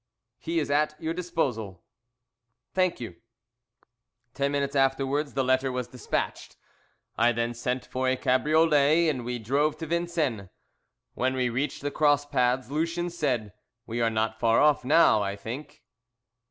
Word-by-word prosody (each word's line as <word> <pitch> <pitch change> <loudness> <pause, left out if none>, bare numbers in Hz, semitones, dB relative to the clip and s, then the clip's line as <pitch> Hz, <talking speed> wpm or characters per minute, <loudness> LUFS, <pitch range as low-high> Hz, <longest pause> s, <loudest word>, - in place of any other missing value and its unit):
"He 165 +1 -3
is 150 -3 0
at 150 +1 +1
your 160 0 -2
disposal." 130 - -3 0.9
"Thank 185 -1 +1
you." 110 -8 -7 1.2
Ten 140 0 0
minutes 140 0 -1
afterwards 135 +2 +1
the 135 - +1
letter 130 +1 +1
was 125 -1 -3
despatched. 125 0 -4 0.6
I 120 - +5
then 120 0 -1
sent 125 +2 -3
for 130 0 -1
a 130 - +1
cabriolet 155 +4 +3
and 130 -5 -2
we 125 +1 -3
drove 140 +7 0
to 165 - -5
Vincennes. 160 - -1 0.6
When 130 +1 0
we 125 -1 +1
reached 135 +4 -3
the 145 - -2
cross 145 -1 +2
paths 130 -2 0
Lucien 165 +3 -1
said, 125 - -2 0.3
"We 120 +1 -3
are 115 - +3
not 110 0 -1
far 115 -1 +3
off 150 -3 +4
now, 130 -5 +5
I 100 0 -2
think." 140 +8 -8
135 Hz, 150 wpm, -27 LUFS, 120-150 Hz, 1.2 s, I